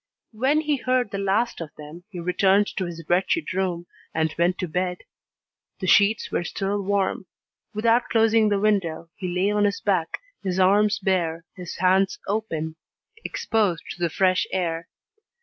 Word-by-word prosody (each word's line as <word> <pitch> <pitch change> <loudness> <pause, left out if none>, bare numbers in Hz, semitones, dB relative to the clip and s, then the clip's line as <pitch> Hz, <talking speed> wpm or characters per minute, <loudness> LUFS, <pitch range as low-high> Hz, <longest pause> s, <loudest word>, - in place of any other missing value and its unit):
When 265 +7 +2
he 300 -2 0
heard 255 -4 0
the 200 - -3
last 200 +2 0
of 165 - -5
them, 155 +4 -11
he 185 -4 -7
returned 190 +3 +3
to 185 - -1
his 165 -2 -7
wretched 185 - +1
room, 180 -2 -1 0.3
and 160 -1 +1
went 175 +2 +1
to 180 - -3
bed. 180 +2 -2 0.8
The 190 - -3
sheets 205 +4 +4
were - - 0
still 200 +3 -2
warm. 195 -1 -1 0.5
Without 230 +3 +2
closing 225 -1 +4
the 205 -1 +1
window, 170 -6 0
he 185 - -5
lay 180 +3 +1
on 210 0 +2
his 200 0 0
back, 185 -5 0 0.2
his 185 -1 -2
arms 205 +3 +4
bare, 170 -4 -1
his 180 -2 -7
hands 190 +1 +2
open, 165 -7 -2 0.5
exposed 205 -7 0
to - - -9
the 170 -1 +1
fresh 185 +2 +2
air. 170 -3 -2
190 Hz, 165 wpm, -24 LUFS, 175-210 Hz, 0.8 s, sheets